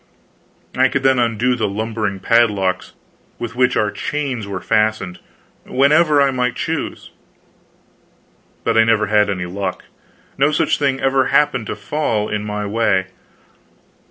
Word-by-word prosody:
I 130 +1 +4
could 135 0 -2
then 135 -1 +3
undo 120 +1 +1
the 115 -3 -1
lumbering 105 -1 -3
padlocks 100 -4 +1 0.4
with 120 0 -6
which 125 0 +2
our 105 -1 +1
chains 135 -7 -3
were 100 -2 -4
fastened, 110 -3 0 0.4
whenever 150 +3 +3
I 140 -1 +3
might 125 -1 -1
choose. - - -4 1.5
But - - +2
I - - +7
never 115 -1 +2
had 105 0 +2
any 95 -3 -2
luck; 95 +1 -4 0.6
no 140 +2 +4
such 150 - +1
thing 135 -2 0
ever 135 -1 +2
happened 125 -7 +1
to - - -3
fall 105 -1 -2
in 105 0 -2
my 105 0 -4
way. 100 -3 0
115 Hz, 140 wpm, -19 LUFS, 105-130 Hz, 1.5 s, I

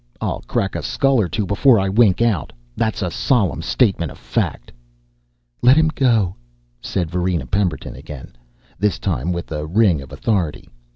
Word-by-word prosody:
"I'll - - -3
crack - - -1
a - - -3
skull 135 -3 +2
or 90 - -1
two 105 +6 -1
before 110 +5 +4
I 95 - 0
wink 100 0 +3
out. 105 -10 0 0.2
That's 110 -2 -1
a 90 - -2
solemn 95 - +1
statement 90 - +1
of - - -12
fact." - - -3 0.9
"Let 130 +4 +6
him 160 0 +4
go," 115 -9 +2 0.5
said 85 +1 -2
Varina 90 -4 -1
Pemberton 90 +2 -2
again, 75 -5 -10 0.4
this 105 0 +1
time 75 +9 -2
with 85 -1 -5
a 75 0 -3
ring 90 -4 +3
of 65 - -12
authority. 95 -9 -2
95 Hz, 165 wpm, -20 LUFS, 85-115 Hz, 0.9 s, Let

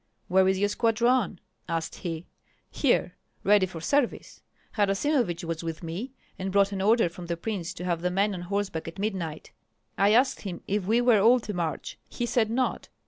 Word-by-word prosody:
"Where 190 +1 +4
is 190 0 +2
your 205 +2 +2
squadron?" 230 -2 +1 0.3
asked 165 -1 -2
he. 165 -1 -5 0.5
"Here, - - +1 0.3
ready 200 -2 +4
for 175 -2 -8
service. 280 - -1 0.3
Harasimovich 205 - +1
was 165 0 -4
with 165 0 -5
me, 180 +11 -5 0.3
and 190 +1 -3
brought 200 0 +3
an 195 -1 -3
order 220 +1 +4
from 175 +1 -9
the 170 0 -2
prince 185 -2 -3
to 180 - -6
have 170 -2 -1
the 180 - +1
men 200 +3 +1
on 180 - -5
horseback 195 -3 -3
at 165 - -8
midnight. 190 -7 -4 0.5
I 200 +2 +5
asked 260 +3 +3
him 185 -4 -6
if 200 -1 -1
we 225 +5 +3
were 240 -3 +5
all 240 +4 +6
to 210 - -5
march; 170 -4 -3
he 240 - -3
said 230 -2 +1
not. 250 +3 -1
195 Hz, 190 wpm, -27 LUFS, 175-225 Hz, 0.5 s, all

